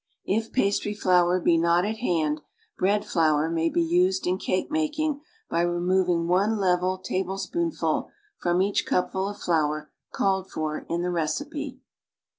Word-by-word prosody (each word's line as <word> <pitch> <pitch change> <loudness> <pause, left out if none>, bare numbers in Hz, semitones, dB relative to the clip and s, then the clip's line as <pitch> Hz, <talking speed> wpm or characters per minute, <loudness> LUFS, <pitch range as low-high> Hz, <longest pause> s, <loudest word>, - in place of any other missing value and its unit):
If 220 +3 -1
pastry 205 -3 0
flour 180 -2 +3
be 170 -1 +3
not 170 +2 +3
at 220 +1 -2
hand, 155 -9 0 0.3
bread 205 +2 +1
flour 160 -2 +2
may 165 0 +1
be 170 - +1
used 180 +3 +2
in 185 +1 0
cake 185 +10 -1
making 310 -1 -1 0.3
by 170 - 0
removing 175 0 +1
one 200 +5 +2
level 185 0 +1
tablespoonful 195 - -2 0.3
from 175 +1 +1
each 200 +1 0
cupful 190 +2 0
of 205 - -7
flour 155 -4 0 0.2
called 190 -1 0
for 155 -1 -4
in 170 +1 -1
the 180 - -1
recipe. 290 - -3
185 Hz, 145 wpm, -26 LUFS, 170-200 Hz, 0.3 s, flour